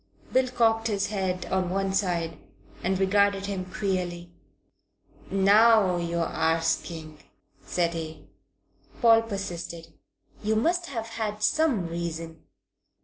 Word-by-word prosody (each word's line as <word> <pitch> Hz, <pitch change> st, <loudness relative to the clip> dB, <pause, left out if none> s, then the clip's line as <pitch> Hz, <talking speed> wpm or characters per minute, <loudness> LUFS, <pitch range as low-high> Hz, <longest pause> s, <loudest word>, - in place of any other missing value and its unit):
Bill 260 Hz, 0 st, +4 dB
cocked 225 Hz, -2 st, +2 dB
his 200 Hz, -3 st, -1 dB
head 190 Hz, -3 st, -2 dB
on 185 Hz, -1 st, +1 dB
one 195 Hz, +1 st, -1 dB
side 170 Hz, -5 st, -1 dB, 0.4 s
and 190 Hz, +1 st, 0 dB
regarded 200 Hz, +1 st, +2 dB
him 195 Hz, -2 st, -3 dB
queerly. 180 Hz, -4 st, -2 dB, 1.0 s
"Now 200 Hz, -1 st, +5 dB
you're 170 Hz, -1 st, -1 dB
arsking," 160 Hz, -1 st, -1 dB, 0.4 s
said 170 Hz, -1 st, 0 dB
he. 160 Hz, -1 st, -6 dB, 0.7 s
Paul 225 Hz, -2 st, +6 dB
persisted. 175 Hz, -6 st, -6 dB, 0.5 s
"You 215 Hz, +1 st, 0 dB
must 345 Hz, +10 st, +1 dB
have 230 Hz, -7 st, -4 dB
had 215 Hz, -2 st, -4 dB
some 265 Hz, -, +2 dB
reason." 165 Hz, -1 st, -5 dB
190 Hz, 110 wpm, -27 LUFS, 170-215 Hz, 1.0 s, Paul